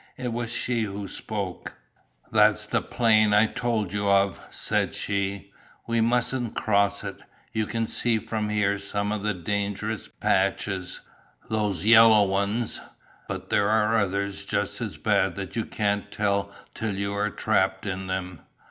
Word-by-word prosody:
It 125 -2 -3
was 120 -1 -3
she 120 -1 0
who 100 0 -5
spoke. 100 -3 -5 0.6
"That's - - +4
the - - 0
plain 110 -3 +3
I 105 +1 +6
told 110 -4 -2
you 100 -1 0
of," 100 0 +3
said - - -1
she, 100 0 -2 0.3
"we 115 -1 +1
mustn't 120 +1 +1
cross 100 -1 +1
it, 100 -1 -6 0.3
you 110 -1 0
can 115 -1 -1
see 115 +1 +1
from 110 -1 -3
here 100 -1 +1
some 100 +1 -2
of 105 -1 -2
the 105 -1 -1
dangerous 105 +3 -2
patches, 95 -1 -1 0.5
those 105 -5 0
yellow 110 -1 +8
ones, 100 +4 -1 0.5
but - - -6
there 100 0 +3
are 110 +1 +3
others 100 0 -1
just - - -2
as - - -4
bad - - +1
that 100 0 -6
you 115 - -1
can't 100 -1 -1
tell 100 -1 0 0.2
till 110 -3 -3
you 100 +1 -2
are 105 +1 0
trapped 105 -3 0
in 95 -1 -3
them. 90 -2 -4
105 Hz, 155 wpm, -26 LUFS, 100-110 Hz, 0.6 s, yellow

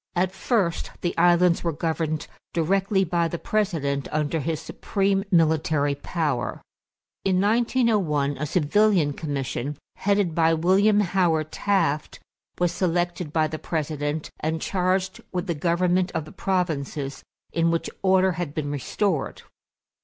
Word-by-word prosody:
At 180 +1 +1
first 190 -4 0
the 175 - -1
islands 175 0 +4
were 170 - +1
governed 160 0 -2 0.3
directly 195 +4 +2
by 170 -1 +1
the 170 - -4
President 160 -10 -1
under 155 +1 0
his 155 +1 -2
supreme 195 +4 -1
military 160 -4 +2
power. 145 -2 -2 0.6
In 185 -1 +2
1901 205 - +2
a 150 - -2
civilian 180 -1 +3
commission, 140 -2 -3 0.2
headed 200 -4 +1
by 165 0 +3
William 195 +6 +4
Howard 170 -5 +1
Taft, 165 -7 0 0.4
was 175 -1 +1
selected 175 -2 -1
by 155 0 +2
the 155 0 -4
President 150 -1 -3
and 160 +1 -1
charged 185 +1 0
with 180 -1 -2
the 175 - -1
government 180 +3 +1
of 155 - -1
the 155 - -12
provinces 150 -7 -2 0.3
in 165 0 +2
which 165 0 0
order 190 0 +4
had 165 -4 -4
been 145 -2 -2
restored. 150 +3 -2
170 Hz, 130 wpm, -24 LUFS, 155-190 Hz, 0.6 s, islands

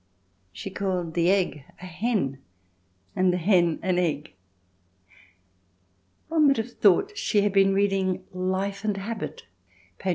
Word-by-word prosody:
She 195 - -7
called 185 -4 -2
the 170 +1 +2
egg 185 -7 +1 0.2
a 185 - -9
hen 180 - -2 0.8
and 185 -1 +3
the 180 - 0
hen 175 -2 +3
an 185 -1 +1
egg. 155 - -2 1.9
One 315 -2 +3
would 275 - +4
have 225 +2 -3
thought 215 - +3
she 210 - +1
had 205 -1 0
been 195 -1 +4
reading 195 -2 +1
Life 190 +2 -2
and 210 -2 -1
Habit 215 +4 -6 0.5
[p. 190 - -3
190 Hz, 135 wpm, -25 LUFS, 180-205 Hz, 1.9 s, would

